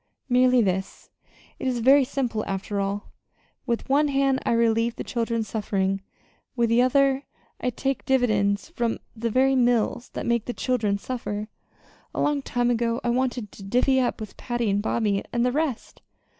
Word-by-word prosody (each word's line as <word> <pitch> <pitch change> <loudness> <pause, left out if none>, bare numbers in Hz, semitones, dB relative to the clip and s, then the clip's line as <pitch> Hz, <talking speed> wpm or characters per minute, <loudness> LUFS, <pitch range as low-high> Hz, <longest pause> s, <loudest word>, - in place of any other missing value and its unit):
"Merely 250 -1 +4
this. 190 -1 -3 0.5
It - - -3
is 255 -1 0
very 270 +4 +6
simple, 245 -4 -2
after 195 +1 -3
all. 200 +1 -3 0.6
With 235 -1 -1
one 290 +3 +3
hand 275 -1 +2
I - - +3
relieve 230 0 +2
the - - -5
children's 230 -2 -2
suffering; 195 -2 -1 0.5
with 235 -2 +2
the 230 +1 +4
other 270 +1 +3 0.3
I 250 - 0
take 270 +2 -2
dividends 215 -6 +1
from 235 -1 -1 0.2
the 230 +1 -2
very 265 +3 +3
mills 245 -1 +1
that - - -4
make 235 -2 +1
the 245 - -3
children 220 -7 0
suffer. 215 -2 -4 0.7
A - - -2
long 295 -1 +1
time 245 -2 0
ago 235 0 0
I 240 - 0
wanted 245 -3 -1
to - - -13
'divvy 250 +6 +2
up' 250 -1 0
with 215 -2 -8
Patty, 240 -4 -1
and 200 +1 +1
Bobby 205 -2 0
and 240 0 +1
the 250 - +2
rest. 290 -3 -3
235 Hz, 170 wpm, -25 LUFS, 215-255 Hz, 0.7 s, very